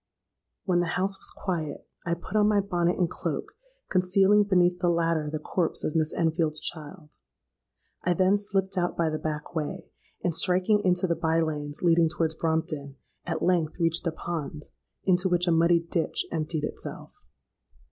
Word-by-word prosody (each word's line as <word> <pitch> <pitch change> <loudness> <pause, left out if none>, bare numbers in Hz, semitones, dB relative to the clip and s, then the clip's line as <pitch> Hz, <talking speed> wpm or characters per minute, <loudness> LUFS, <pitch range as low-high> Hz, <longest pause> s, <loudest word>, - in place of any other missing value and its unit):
"When 180 -3 +2
the 175 0 0
house 190 +1 -1
was - - -4
quiet, 165 -6 -4 0.2
I 170 - +1
put 180 +4 -9
on 210 -1 +5
my 210 -1 +4
bonnet 180 -3 0
and 180 - +2
cloak, - - -4 0.4
concealing 195 +3 +4
beneath 180 -2 +3
the 175 - +2
latter 165 -3 +1
the 155 - -2
corpse 165 +3 -2
of 155 - -2
Miss 155 -1 +1
Enfield's 160 -2 0
child. 150 0 -6 0.9
I 175 0 +2
then 185 +3 +4
slipped 195 -2 0
out 175 0 -1
by 165 -2 +1
the 155 - -2
back 155 +2 -4
way, 165 +3 -3 0.4
and 175 - +1
striking 185 +5 +2
into 180 0 +2
the 170 -2 +1
bye 165 0 +1
lanes 150 -1 -3
leading 165 -1 +4
towards 160 -1 0
Brompton, 155 -4 -2 0.3
at 165 - -2
length 175 -3 +1
reached 165 +1 +1
a - - +1
pond, 160 -2 -5 0.4
into 185 0 +2
which 175 0 +2
a - - +4
muddy 170 +1 +4
ditch 165 0 -1
emptied 155 -1 -2
itself. - - -6
170 Hz, 170 wpm, -27 LUFS, 160-185 Hz, 0.9 s, on